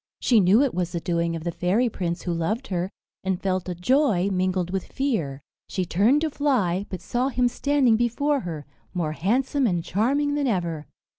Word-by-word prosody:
She 235 -3 +4
knew 200 +7 +5
it 275 - 0
was 175 -1 -2
the 170 - -1
doing 170 0 -1
of 165 - -6
the 170 - -2
fairy 190 +9 +1
prince 175 -6 -3
who 175 - -1
loved 215 +10 -2
her, 180 -1 -1 0.3
and 190 -1 -1
felt 185 -1 -1
a 180 - -3
joy 200 - +2
mingled 185 -1 0
with 190 -2 -3
fear. 165 - -2 0.3
She 185 - -1
turned 215 - +3
to 315 -1 0
fly, 205 -11 0
but 185 - -6
saw 250 +2 -1
him 250 -2 +2
standing 265 -2 +2
before 275 +5 +1
her, 160 - -6 0.3
more 165 -4 -1
handsome 255 - +1
and 175 -4 0
charming 275 - +1
than 290 -1 0
ever. 170 -8 -2
190 Hz, 195 wpm, -24 LUFS, 175-255 Hz, 0.3 s, knew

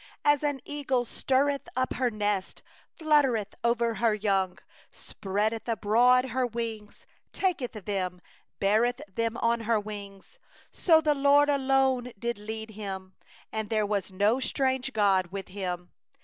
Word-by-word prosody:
11As 290 -1 +4
an 290 -2 -1
eagle 275 -4 -1
that 235 - -13
stirreth 275 +1 0
up 255 0 0
her 250 -1 +1
nest, 205 -3 -2 0.4
Hovereth 275 -10 +2
over 235 0 +2
her 225 -2 +3
young, 195 -3 0 0.3
Spreadeth 215 +3 -3
abroad 245 +4 +3
her 255 +1 0
wings, 225 -3 -6 0.3
taketh 350 -10 -1
them, 190 -4 -3 0.4
Beareth 220 +5 +2
them 230 +3 -2
on 235 0 +2
her 225 -1 +1
pinions— 205 - -9 0.3
12The 315 -3 +4
LORD 285 +1 +5
alone 265 -3 +2
did 235 +1 -3
lead 220 +1 -6
him, 190 -3 -6 0.4
And 220 -1 -3
there 215 -2 +1
was 200 -2 -2
no 205 +6 +2
strange 265 0 0
god 195 -5 +2
with 195 +1 -7
Him. 180 -2 -5
230 Hz, 135 wpm, -28 LUFS, 205-260 Hz, 0.4 s, LORD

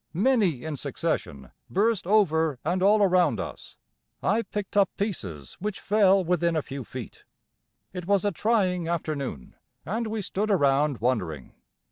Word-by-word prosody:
Many 195 - +2
in 155 -2 -4
succession 70 - -3 0.2
burst 205 -1 +1
over 160 -8 +3
and 180 +3 0
all 205 +2 +5
around 180 -5 +3
us. - - -7 0.5
I 215 +4 +2
picked 210 -3 -6
up 200 -2 +4
pieces 95 - -4
which 210 +2 -3
fell 195 -2 +4
within 170 -1 +1
a 155 - 0
few 135 -1 -6
feet. 125 +1 -9 0.7
It 180 -2 -6
was 200 -1 +2
a 205 - +2
trying 185 -4 +1
afternoon, 150 - -3 0.3
and 225 +6 -2
we 215 -1 -3
stood 205 +4 -2
around 145 - +2
wondering. 90 - -2
180 Hz, 145 wpm, -26 LUFS, 145-205 Hz, 0.7 s, all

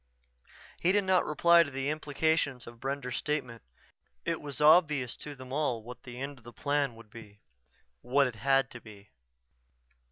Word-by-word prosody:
He 175 - +3
did 205 +1 +2
not 185 -1 +3
reply 170 +3 +5
to 160 - 0
the 135 +1 -2
implications 150 -3 0
of 120 0 -12
Brender's 135 -2 -3
statement. 125 -7 -3 0.6
It 165 -1 -1
was 145 -4 -6
obvious 150 -5 +4
to 145 -1 -8
them 130 0 -10
all 135 -6 -1
what 125 +2 -10
the 125 -1 -10
end 140 0 -6
of - - -24
the 120 - -11
Plan 140 -2 -1
would 115 -2 -15
be. 105 -3 -13 0.6
What 140 +3 +3
it 125 - -2
had 135 +3 +2
to 120 - -10
be. 105 -2 -15
135 Hz, 170 wpm, -30 LUFS, 120-150 Hz, 0.6 s, reply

